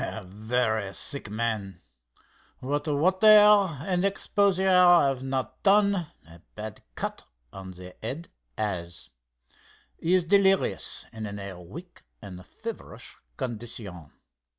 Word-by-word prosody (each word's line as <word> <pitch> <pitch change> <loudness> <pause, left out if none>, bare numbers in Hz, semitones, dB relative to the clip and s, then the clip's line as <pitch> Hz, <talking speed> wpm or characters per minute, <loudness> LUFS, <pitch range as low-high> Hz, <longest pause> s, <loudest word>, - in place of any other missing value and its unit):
"A 110 - -5
very 110 0 -2
sick 140 0 +2
man. 110 -3 -3 0.8
What 145 +4 -3
water 185 +8 +2
and 195 -5 +5
exposure 200 -1 +1
have 175 -8 +5
not 130 -1 -4
done, 200 -3 +3 0.2
a 85 +1 -16
bad 105 -1 -8
cut - - -5 0.3
on 95 -1 -9
the 90 0 -11
head 140 +10 -5 0.3
has. 85 - -4 0.9
He 175 +3 +2
is 180 -2 +1
delirious 195 +1 +2
and 110 -1 -6
in 100 0 -7
a 100 -3 -8
weak 170 - -12 0.2
and 90 -3 -10
feverish - - -9 0.2
condition. 110 - -6
125 Hz, 115 wpm, -26 LUFS, -, 0.9 s, and